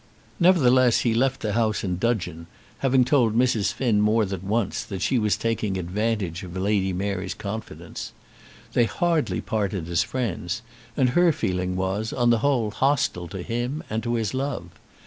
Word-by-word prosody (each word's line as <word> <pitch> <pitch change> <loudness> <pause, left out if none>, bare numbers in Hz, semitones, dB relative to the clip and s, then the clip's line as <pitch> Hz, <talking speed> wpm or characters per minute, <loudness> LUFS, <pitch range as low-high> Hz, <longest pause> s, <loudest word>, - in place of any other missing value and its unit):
Nevertheless 130 -9 +5
he 115 - +1
left 130 +3 +1
the 105 -2 -1
house 110 -2 +1
in 90 -2 -2
dudgeon, 90 -8 -1 0.3
having 130 -2 +3
told 120 -5 +3
Mrs. 120 -5 +2
Finn 115 -6 +1
more 105 +1 +3
than 95 -1 -5
once 115 +1 0
that 95 -5 -5
she 125 +6 +2
was 105 -2 +1
taking 110 -4 -1
advantage 95 -1 -2
of 90 -1 -7
Lady 95 0 +1
Mary's 95 0 -3
confidence. 105 +2 -6 0.6
They 120 - +4
hardly 165 +4 0
parted 100 -5 -2
as 85 -1 +2
friends, 90 -2 -3 0.3
and 130 -3 +3
her 175 +6 +4
feeling 90 -8 -2
was, 95 +4 -2
on 120 -1 +3
the 115 - +3
whole, 120 -5 +1
hostile 130 -9 +1
to 95 0 -6
him 120 - -3
and 110 +1 -1
to 120 0 -1
his 110 -3 -1
love. 135 +2 -3
110 Hz, 165 wpm, -24 LUFS, 95-125 Hz, 0.6 s, Nevertheless